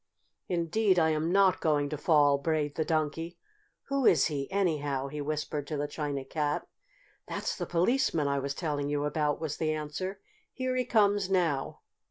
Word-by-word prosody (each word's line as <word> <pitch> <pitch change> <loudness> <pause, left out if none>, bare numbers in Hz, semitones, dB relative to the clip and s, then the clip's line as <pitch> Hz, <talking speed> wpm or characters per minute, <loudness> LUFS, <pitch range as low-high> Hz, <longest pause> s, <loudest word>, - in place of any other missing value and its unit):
"Indeed 185 +3 +2
I 160 -2 +4
am 155 +2 0
not 195 -1 +4
going 150 -3 +2
to 155 - -3
fall!" 145 -2 +4
brayed 150 -1 0
the 160 - 0
Donkey. 160 +1 -2 0.5
"Who 275 -3 +2
is 155 - +5
he, 140 -3 -2
anyhow?" 145 -8 0
he 150 +1 -5
whispered 150 0 -3
to 150 - -3
the 145 +1 -1
China 145 -2 -4
Cat. 150 +1 -1 0.6
"That's - - -3
the - - -4
Policeman 175 - +1
I 140 0 +1
was 140 +1 -3
telling 145 -4 -2
you 145 0 0
about," 150 -1 0
was 155 -2 -3
the 155 -1 0
answer. 155 +6 -4 0.3
"Here 255 0 -2
he 255 0 0
comes 205 -4 +3
now!" 165 -8 0
155 Hz, 175 wpm, -29 LUFS, 145-180 Hz, 0.6 s, is